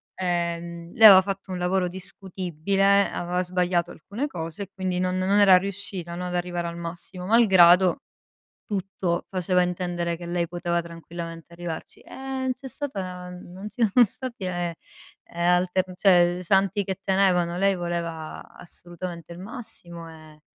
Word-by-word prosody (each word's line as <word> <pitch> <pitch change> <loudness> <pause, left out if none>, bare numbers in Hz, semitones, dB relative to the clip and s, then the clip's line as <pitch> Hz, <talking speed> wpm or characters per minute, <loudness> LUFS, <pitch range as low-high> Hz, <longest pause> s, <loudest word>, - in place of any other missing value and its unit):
ehm, 170 -1 -3
lei 225 - 0
aveva 190 -3 +11
fatto 195 0 -5
un 180 - -3
lavoro 180 +1 +1
discutibile, 190 +1 0
aveva 180 +1 -2
sbagliato 180 -1 0
alcune 205 - -5
cose 165 - -6
e 195 - -12
quindi 185 -1 -2
non 185 0 0
non 190 +2 +2
era 195 -2 +8
riuscita, 190 -3 -4
no, 180 +1 -4
ad 180 - -5
arrivare 175 -1 -2
al 170 - -6
massimo, 170 +2 -7
malgrado 190 -5 +6 0.7
tutto 190 -3 -2
faceva 180 -1 +1
intendere 175 -1 -2
che 175 +1 -9
lei 170 -1 -1
poteva 175 0 -1
tranquillamente 165 0 -9
arrivarci. 170 -2 -7
E 265 -1 -4
c'è 255 +2 -11
stata 185 -11 -5
n 180 -1 -11
non 190 +3 -7
ci 225 +4 -4
sono 240 +5 +6
stati 235 0 -7
eh 175 -2 -2 0.6
alter 180 +2 +2
cioè 180 -2 +4
santi 195 +2 +2
che 190 -1 -4
tenevano. 180 -3 +2
Lei 195 0 +3
voleva 170 -2 -4
assolutamente 175 -1 -8
il 170 - -10
massimo 185 -6 -6
e 155 -1 -15
180 Hz, 150 wpm, -25 LUFS, 170-195 Hz, 0.7 s, aveva